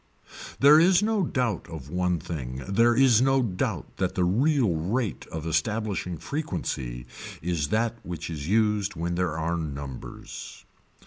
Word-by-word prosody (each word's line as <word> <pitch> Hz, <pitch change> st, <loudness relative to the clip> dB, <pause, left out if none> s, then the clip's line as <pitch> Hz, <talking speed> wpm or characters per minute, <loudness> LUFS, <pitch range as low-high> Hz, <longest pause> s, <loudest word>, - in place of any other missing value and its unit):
There 145 Hz, +3 st, +8 dB
is 180 Hz, +3 st, +5 dB
no 215 Hz, -2 st, +1 dB
doubt 125 Hz, -, -1 dB
of 75 Hz, -4 st, -8 dB
one 90 Hz, -1 st, +1 dB
thing 65 Hz, -6 st, -5 dB
there 115 Hz, +4 st, +4 dB
is 125 Hz, -3 st, +5 dB
no 135 Hz, 0 st, +3 dB
doubt 90 Hz, -6 st, -3 dB
that -, -, -1 dB
the 90 Hz, -, +2 dB
real 120 Hz, -, +3 dB
rate 100 Hz, +6 st, -2 dB
of 80 Hz, -1 st, -6 dB
establishing 90 Hz, +2 st, -1 dB
frequency 65 Hz, -, -4 dB, 0.4 s
is 85 Hz, -4 st, 0 dB
that 115 Hz, +5 st, 0 dB
which 85 Hz, -1 st, -6 dB
is 75 Hz, -3 st, -5 dB
used 105 Hz, -1 st, +2 dB
when 85 Hz, +1 st, -2 dB
there 85 Hz, -3 st, -1 dB
are 85 Hz, +2 st, -1 dB
numbers. 70 Hz, -5 st, -7 dB
90 Hz, 145 wpm, -26 LUFS, 80-120 Hz, 0.4 s, There